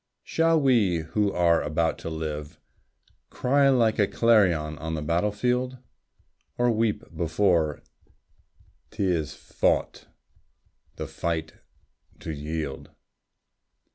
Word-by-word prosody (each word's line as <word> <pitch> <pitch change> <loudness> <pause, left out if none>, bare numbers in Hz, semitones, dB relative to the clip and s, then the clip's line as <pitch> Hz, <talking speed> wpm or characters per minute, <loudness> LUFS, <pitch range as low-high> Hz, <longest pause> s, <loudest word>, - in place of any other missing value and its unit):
Shall 165 0 +2
we 110 - +3
who 100 +6 0
are 85 -2 +3
about 80 +2 -1
to - - -5
live, 80 0 -5 0.7
Cry 140 +2 +2
like 115 -4 +2
a 100 - +4
clarion 90 -10 +2
on 80 0 -4
the 75 - -4
battle 85 +7 +1
field? 125 +4 -1 0.8
Or 120 0 +3
weep 115 0 -1
before 85 -3 +1 1.1
't - - -4
is 85 -6 -1
fought, - - -1 0.9
the - - -5
fight 80 -2 -3 0.7
to - - -5
yield? 75 -1 -5
85 Hz, 110 wpm, -26 LUFS, 80-115 Hz, 1.1 s, a